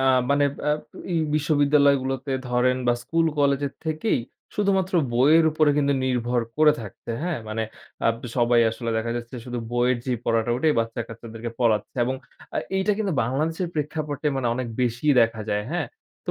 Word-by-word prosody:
আ - - +1 0.3
মানে 145 0 +4 0.3
আব 150 - +1 0.3
এই 170 - +2 0.2
বিশ্ববিদ্যালয় 145 -1 +4
গুলোতে 135 +1 -3 0.2
ধরেন 125 +1 +2
বা 120 - +5
স্কুল 165 +3 +1
কলেজের 140 -1 +2
থেকেই 160 - 0 0.3
শুধুমাত্র 195 -2 +1 0.2
বইয়ের 150 +7 +5
উপরে 155 -1 +3
কিন্তু 140 -1 +2
নির্ভর 125 -1 0 0.2
করে 155 0 +6
থাকছে। 110 +1 -9
হ্যাঁ? 175 -2 -1
মানে 110 +1 -2 0.4
আব 115 - +3 0.2
সবাই 120 -1 +4
আসলে 115 +1 -4
দেখা 110 +1 -1
যাচ্ছে 120 +1 -7
শুধু 125 -1 -4
বইয়ের 120 +1 +2
যেই 125 -3 -1
পড়াটা, 115 0 +1
ওটাই 150 +4 +2
বাচ্চা-কাচ্চাদেরকে 115 0 -6
পড়াচ্ছে। 110 -2 +1
এবং 130 +2 -1 0.4
আ - - +1 0.2
এইটা 190 +2 +2
কিন্তু 205 -4 0
বাংলাদেশের 160 +8 -1
প্রেক্ষাপটে 150 -1 -3
মানে 130 -2 -1
অনেক 125 0 -3
বেশিই 125 +4 +2
দেখা 115 -1 +2
যায়। 105 0 0
হ্যাঁ? 175 - -1 0.4
তো - - -1
130 Hz, 165 wpm, -24 LUFS, 120-155 Hz, 0.4 s, করে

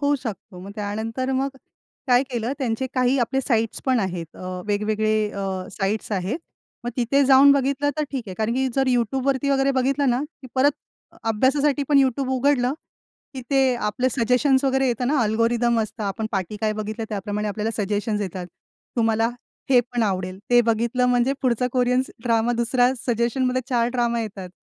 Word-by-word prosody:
होऊ 285 0 +2
शकतो." 205 -5 -7
मग 195 +2 -9
त्यानंतर 220 +5 -3
मग 265 +1 0 0.6
काय 250 -1 +5
केलं 240 0 -2
त्यांचे 255 -1 -1
काही 255 +1 +2
आपले 245 +2 0
अ, - - 0
साइट्स 225 -3 0
पण 255 -3 +3
आहेत 175 -4 -4 0.3
वेगवेगळे 215 +1 0
अ, 190 -2 -4
साइट्स 205 +3 -2
आहेत. 195 - -1 0.5
मग 240 - -2
तिथे 265 +3 +2
जाऊन 270 +1 +7
बघितलं 280 +1 +1
तर - - +2
ठीक 270 -3 -3
आहे. 185 - -6
कारण 220 +1 0
की 265 +1 +1
जर 270 -1 +2
YouTube 250 +1 0
वरती 275 0 +1
वगैरे 270 0 +3
बघितलं 270 +1 +1
ना, 245 +3 +1 0.2
की - - -9
परत 275 +2 +4 0.5
अभ्यासासाठी 270 +6 +2
पण 290 -2 +5
YouTube 265 0 +1
उघडलं 260 -1 +2 0.6
की 260 - -5
ते 270 -2 +3
आपलं 240 +2 0
सजेशन्स 260 +3 +2
वगैरे 265 0 +2
येता 245 0 -1
ना, 280 +4 +1
अल्गोरिदम 230 +2 +2
असतात 215 0 -4
आपण 215 +3 -2
पाठी 195 +1 -2
काय 215 -1 +1
बघितलं 215 +1 -4
त्याप्रमाणे 210 0 -3
आपल्याला 215 +2 -2
सजेशन्स 210 +1 -1
येतात. 185 -2 -4 0.5
तुम्हाला 225 -1 +2 0.4
हे 250 -2 +7
पण 245 0 -3
आवडेल, 185 -2 -2
ते 245 0 +7
बघितलं 235 +2 +1
म्हणजे 245 +1 +2
पुढचा 250 -1 +1
कोरियन 250 0 +2 0.2
ड्रामा 230 -1 +2
दुसऱ्या 245 +2 +2
सजेशनमध्ये 250 +2 0
4 240 -3 +2
ड्रामा 235 -1 0
येतात. 200 -4 -6
240 Hz, 175 wpm, -23 LUFS, 215-265 Hz, 0.6 s, जाऊन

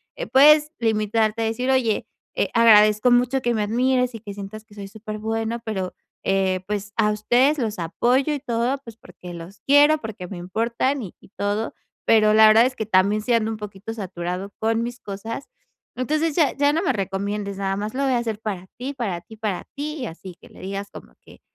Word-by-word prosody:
eh, - - -4
puedes 300 +3 +6
limitarte 220 0 +1
a - - 0
decir: 225 +4 -2
"Oye, 240 -5 +1 0.3
eh, - - 0
agradezco 215 0 +6
mucho 250 +2 +3
que 240 -1 0
me 215 -2 0
admires 250 +3 +1
y - - -6
que 205 -2 -8
sientas 200 +2 -8
que 215 - -20
soy 200 -1 -7
súper 215 +1 -8
bueno, 225 +1 -2
pero, 190 -5 -3 0.3
eh, 190 -1 +1
pues, 205 0 -4
a 210 -2 +3
ustedes 245 +8 +2
los 220 -4 -2
apoyo 250 - +1
y 290 - -2
todo, 245 0 -1
pues 230 -2 -10
porque 180 -5 -12
los 170 +2 -10
quiero, 290 +2 +6
porque 210 -6 -7
me 195 - -7
importan, 235 +9 -1
y 190 - -8
y - - -18
todo, 205 +2 -1 0.3
pero 215 -1 +5
la 220 0 +8
verdad 220 +2 +7
es 255 0 -1
que 220 - -2
también, 200 +1 +3
sí 240 +3 0
ando 225 -1 +2
un 220 - -4
poquito 210 +1 -7
saturado 185 -2 -5
con 225 +1 +1
mis 240 +1 -5
cosas, 220 +6 -6 0.5
entonces 305 +4 0
ya, 310 -4 +3
ya 285 +1 +3
no 325 - +1
me - - +2
recomiendes, 200 0 -3
nada 195 0 -1
más 210 +2 -4
lo 275 +2 -1
voy 265 -1 +2
a - - +3
hacer 225 -3 -3
para 195 -4 -5
ti, 260 +3 -4
para 205 -10 -3
ti, 220 +4 -14
para 210 -4 -3
ti". 300 +2 -4
Y - - -2
así, 180 +1 -10
que - - -15
le - - -16
digas 195 +1 -5
como - - -12
que, - - -17
220 Hz, 215 wpm, -23 LUFS, 200-250 Hz, 0.5 s, la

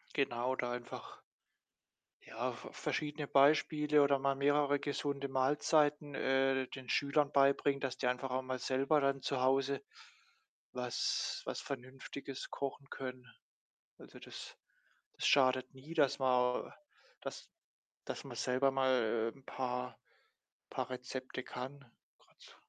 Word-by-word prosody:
Genau, 130 -2 +1
da 125 -1 -1
einfach 120 0 -7 1.1
ja, - - -2
ver - - -10
verschiedene 150 -1 -2
Beispiele 150 +1 +4
oder 140 -1 +4
mal 140 0 +1
mehrere 145 +1 +3
gesunde 140 -1 -2
Mahlzeiten, 145 +2 +2
äh, 135 0 +2
den 130 -2 -9
Schülern 145 +2 +2
beibringen, 140 0 +4
dass 130 -2 -2
die 130 - -2
einfach 125 +1 0
auch 130 +1 0
mal 130 0 -3
selber 135 +4 +2
dann 140 -1 +1
zu 135 -2 -1
Hause 135 +1 +2 0.9
was 125 -1 -1
was - - -3
Vernünftiges 135 +1 -7
kochen 140 0 -4
können. 130 -1 -6 0.7
Also, - - -13
das - - -9 0.6
das - - -4
schadet 130 -1 +4
nie, 135 +5 -10
dass 145 -3 +3
man 125 -1 +2 0.5
dass - - -7 0.6
dass - - -5
man - - -8
selber 130 +2 +2
mal 120 -4 +2
'n 135 - -19
paar 125 -2 -3 0.7
paar 130 -2 -2
Rezepte 130 0 -5
kann. 130 +3 -6 0.4
Grad - - -29
so - - -15
135 Hz, 130 wpm, -35 LUFS, 130-140 Hz, 1.1 s, Beispiele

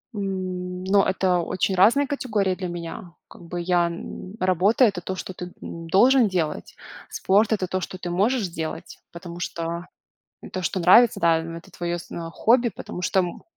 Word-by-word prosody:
М, 185 -2 -4
но 195 +1 +4
это 185 -1 +1
очень 185 +3 -1
разные 230 +10 +5
категории 215 -9 0
для 185 0 -4
меня. 170 0 -7
Как - - -15
бы 175 +1 -5
я 175 0 +2
н 175 +3 -7
работа- 185 +7 +3
это 200 -5 0
то, 190 +2 -4
что 185 - -6
ты, 180 0 -8
м, 165 0 -8
должен 245 +6 +5
делать. 170 -6 -3 0.3
Спорт- 205 +3 +2
это 195 -4 0
то, 185 +1 -2
что 185 - -6
ты 180 -1 -6
можешь 210 +4 +1
делать, 160 0 -6
потому 170 0 -9
что, 170 0 -4 0.7
то, 185 - -3
что 185 +2 -1
нравится, 220 +7 +6
да 165 -1 +4 0.2
это 170 - -12
твое 175 0 -3
сно 170 -1 -7
хобби, 235 +6 +3
потому 180 -2 -8
что 190 +2 +2
м 175 -2 -4
185 Hz, 175 wpm, -24 LUFS, 175-200 Hz, 0.7 s, нравится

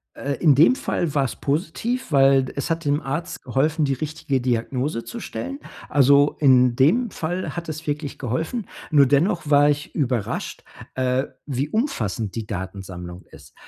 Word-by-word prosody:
Äh, 140 0 -3
in 155 -5 +5
dem 160 - +6
Fall 170 - -2
war 140 -2 +2
es - - -4
positiv, 175 - -2
weil 135 -1 +5
es 140 - -3
hat 165 0 -1
dem 145 +1 +1
Arzt 160 +5 -4
geholfen, 150 +4 +1
die 140 - +1
richtige 150 -1 -2
Diagnose 125 +1 -1
zu 235 - -7
stellen. 275 +5 -5 0.3
Also 140 +1 +4
in 125 -4 +5
dem 195 - +3
Fall 175 +2 -4
hat 170 -1 -5
es 155 +1 -6
wirklich 145 -1 -3
geholfen. 160 - -3 0.2
Nur 140 -3 +6
dennoch 150 +3 +1
war 145 0 +6
ich 145 0 -3
überrascht, 125 -8 -2 0.3
äh, 130 +1 +1 0.2
wie 140 +1 -2
umfassend 115 - -2
die 110 -2 -4
Datensammlung 95 -2 -7
ist. - - -16
145 Hz, 160 wpm, -23 LUFS, 125-160 Hz, 0.3 s, dem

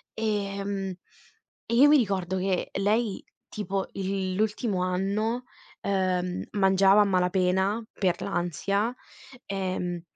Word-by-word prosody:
Ehm, 200 -2 -2 0.8
e 235 - -2
io 280 +4 +7
mi 300 0 +7
ricordo 190 -5 0
che 185 -1 -1
lei 210 +1 +1 0.3
tipo 195 -2 -3
il 190 -1 -2
l'ultimo 210 -2 0
anno, 200 +6 -1 0.4
ehm, 185 -2 0
mangiava 195 0 +5
a - - +7
malapena 190 +3 +1
per 180 -3 0
l'ansia, 200 +6 -1 0.5
ehm, 185 -3 -3
195 Hz, 105 wpm, -27 LUFS, 185-210 Hz, 0.8 s, io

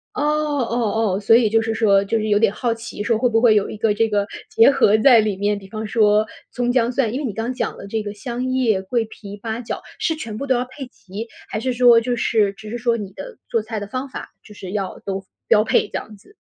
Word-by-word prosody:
哦， - - -2
哦， 245 -8 0
哦， - - -2
所 215 +2 +5
以 230 -2 +4
就 225 - +3
是 225 0 -1
说 200 -3 +3
就 225 +3 0
是 215 - -2
有 205 - +4
点 215 -2 +3
好 240 +1 -1
奇 230 -2 -8
说 230 +1 +1
会 250 +3 +2
不 225 -1 +2
会 230 -3 +5
有 205 - +2
一 - - -7
个 210 -1 +1
这 225 +1 +2
个 205 -2 0 0.2
结 225 - +5
合 215 -6 +4
在 245 0 +7
里 215 -2 0
面， 205 +1 0
比 195 -1 -11
方 215 +2 -5
说 215 -1 +3 0.2
葱 245 -1 -1
姜 245 -1 +2
蒜 245 -4 0
因 260 - -2
为 295 - -3
你 225 - -3
刚 225 +4 -3
讲 255 - -3
了 - - -9
这 220 +1 -2
个 205 -1 -5
香 240 +4 -5
叶， 250 -6 +1
桂 230 +4 -1
皮， 205 -2 -10
八 220 +2 -4
角 225 - -5 0.2
是 320 - 0
全 225 -8 -6
部 280 - -4
都 265 - +2
要 245 0 0
配 260 +1 -9
齐， 210 -2 -9 0.2
还 215 - -3
是 255 +3 -1
说 240 -1 +6
就 245 +1 -1
是 215 -4 +1
只 215 +1 -11
是 235 - -4
说 235 0 +1
你 205 -4 -6
的 - - -9
做 230 - +1
菜 220 0 -4
的 205 - -6
方 255 +5 -4
法 260 - -8
就 210 - -14
是 190 -3 -8
要 195 -2 -3
都 195 -1 -4 0.2
标 215 -2 +5
配 215 - +2
这 - - -27
样 215 - -9
子。 390 - -21
225 Hz, 290 characters per minute, -21 LUFS, 210-245 Hz, 0.2 s, 在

